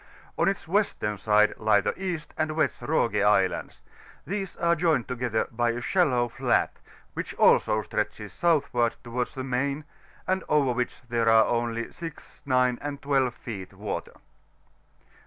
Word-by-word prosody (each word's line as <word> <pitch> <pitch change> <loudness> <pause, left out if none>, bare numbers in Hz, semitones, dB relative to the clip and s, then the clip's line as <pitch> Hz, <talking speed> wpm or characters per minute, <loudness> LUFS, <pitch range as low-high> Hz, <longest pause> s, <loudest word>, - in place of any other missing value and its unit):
On - - +2
its 195 -2 -1
western 160 - 0
side 105 0 +4
lie 110 -1 +4
the - - -1
East 170 -5 -4
and 155 0 -1
West 155 -4 0
Roge 115 -9 +1
Islands: 100 -2 +1 0.4
these 195 0 -4
are 170 0 +2
joined 155 -7 +1
together 120 -3 -1
bj 120 0 +1
a - - -4
shallow 130 -6 +2
fiaJt^ - - +1 0.4
which - - -5
also 110 -1 +4
stretches 105 -2 -3
southward 135 -8 +1
towards 120 +1 -3
the 130 - -4
main, 140 +3 -1 0.4
and 185 -1 0
over 145 -4 +3
which 125 0 -3
there 115 -1 +1
are 110 -1 +6
only 115 -1 -1
6, 165 -3 -10
9, 125 -2 +2
and 145 -1 -4
12 135 -3 +2
feet 100 -6 -7
water. - - -5
125 Hz, 150 wpm, -27 LUFS, 115-155 Hz, 0.4 s, are